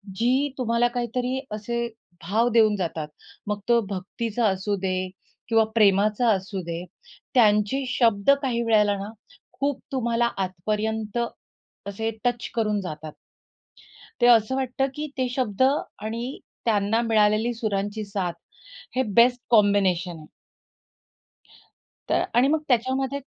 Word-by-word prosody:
जी 230 +5 +1 0.3
तुम्हाला 235 -1 +2
काहीतरी 250 +2 -2
असे 235 +3 -2 0.4
भाव 220 +8 +2
देऊन 220 -2 +4
जातात. 165 -5 -3 0.4
मग 210 0 -1
तो 235 0 +5
भक्तीचा 215 +4 -2
असू 195 +1 0
दे 190 -1 0 0.5
किंवा 225 -2 +4
प्रेमाचा 210 +2 +4
असू 195 -1 -1
दे, 170 +1 -4 0.5
त्यांचे 210 +2 +3
शब्द 230 -1 +3
काही 245 -4 0
वेळेला 210 -3 +3
ना 200 - -5 0.5
खूप 280 0 0
तुम्हाला 235 -3 +1
आतपर्यंत 210 +4 -2 0.7
असे 220 +3 -2 0.2
टच 245 -1 0
करून 210 -3 0
जातात. 155 -3 -7 1.1
ते 240 - +6
असं 235 +1 +5
वाटतं 265 0 0
की 300 - -3
ते 255 - +1
शब्द 245 -4 -2 0.4
आणि 235 +5 -4 0.3
त्यांना 215 0 +2
मिळालेली 215 +2 +3
सुरांची 210 -1 -2
साथ 195 -4 -2 0.6
हे 260 - +2
बेस्ट 245 +1 +5
कॉम्बिनेशन 195 -6 +3
आहे. 155 - -13 1.8
तर - - +2
आणि 245 +3 +5
मग 310 +2 +2
त्याच्यामध्ये 260 +3 0
220 Hz, 120 wpm, -25 LUFS, 200-240 Hz, 1.8 s, ते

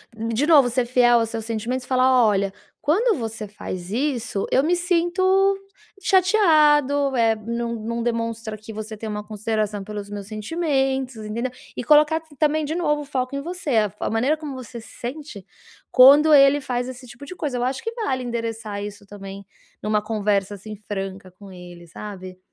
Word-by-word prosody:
de 230 +6 -1
novo, 285 -7 +6
ser 245 0 0
fiel 240 -1 +4
aos 225 - -1
seus 225 -1 -4
sentimentos 235 +3 -3
e - - -19
falar: 255 -1 +4
"Olha, 200 -2 +1 0.3
quando 420 +8 +2
você 225 -1 -5
faz 185 -3 -7
isso, 240 -5 -1
eu 265 - +4
me 335 +4 +2
sinto 350 +1 0 0.8
chateado, 305 -8 +4
eh, 225 -2 +3
não 235 +2 -4
não 230 +1 -4
demonstra 230 -2 -3
que 215 +1 -11
você 215 +1 -6
tem 220 +1 -6
uma 210 0 -4
consideração 215 -1 -2
pelos 205 -1 -7
meus 205 -1 -7
sentimentos." 265 +2 -1
Entendeu 220 +4 -4 0.2
e - - -4
colocar 305 +4 +4 0.2
também 305 +1 +2
de 300 +2 -3
novo 295 -4 0
o 290 - -8
foco 260 -1 -3
em 280 - -2
você, 340 -2 -5
a 215 - +5
f 200 - -23
a - - -2
maneira 255 +8 +1
como 300 -3 -7
você 250 -1 -8
se 225 - -13
sente 245 - -7 0.5
quando 285 +4 +8
ele 280 0 +6
faz 245 -1 -2
esse 255 0 -9
tipo 285 - -11
de 365 - -9
coisa. 280 -7 -3
Eu 245 - -1
acho 260 +1 -3
que 455 - -3
vale 340 - -2
endereçar 225 -3 -4
isso 205 0 -8
também 195 -1 -10 0.4
numa 210 0 +1
conversa, 205 -2 -1
assim, 210 +2 -9
franca 195 -1 -5
com 195 +1 -14
ele, 175 -1 -12
sabe? 185 0 -9
235 Hz, 185 wpm, -23 LUFS, 210-285 Hz, 0.8 s, quando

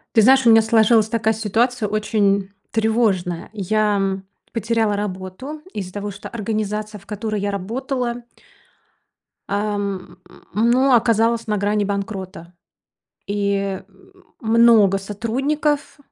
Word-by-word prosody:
Ты 220 - +7
знаешь, 265 +3 +6
у 235 - +6
меня 225 0 +8
сложилась 220 0 +4
такая 220 0 +1
ситуация 225 +2 0
очень, 200 -2 +1 0.2
тревожная. 215 -6 0
Я, 210 0 +1
м, 195 -1 -1 0.3
потеряла 225 -1 0
работу 200 +9 -5
из-за 185 -3 -5
того, 205 +1 -4
что 200 - -9
организация, 215 -1 -3
в 195 - -22
которой 210 0 -3
я 200 +1 -1
работала 240 +5 -3 1.3
ам, 200 -2 -3 0.4
ну 245 +5 +3
оказалась 230 0 +2
на 210 -1 0
грани 205 +1 +1
банкрота. 195 -3 -5 0.7
И, 200 -1 -1
э, - - -17 0.6
много 225 -4 +5
сотрудников 270 +10 -2
215 Hz, 115 wpm, -21 LUFS, 200-230 Hz, 1.3 s, меня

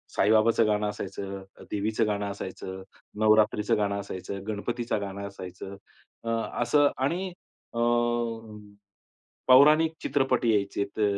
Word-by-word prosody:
साईबाबाचं 110 +2 +4
गाणं 105 0 +1
असायचं, 100 -1 -6 0.3
देवीचं 105 +2 0
गाणं 105 -1 -1
असायचं, 95 -1 -7 0.4
नवरात्रीचं 110 -1 +3
गाणं 100 -1 0
असायचं, 100 0 -6
गणपतीचं 115 +2 -2
गाणं 100 0 -5
असायचं. 95 0 -9 0.5
अ, 115 - -4 0.3
असं 145 +4 +4
आणि 170 +9 -1 0.5
अ, 115 - -3 1.7
पौराणिक 150 +5 +6
चित्रपट 135 -3 +1
यायचेत 100 -2 0
अ, - - +3
105 Hz, 105 wpm, -27 LUFS, 100-120 Hz, 1.7 s, पौराणिक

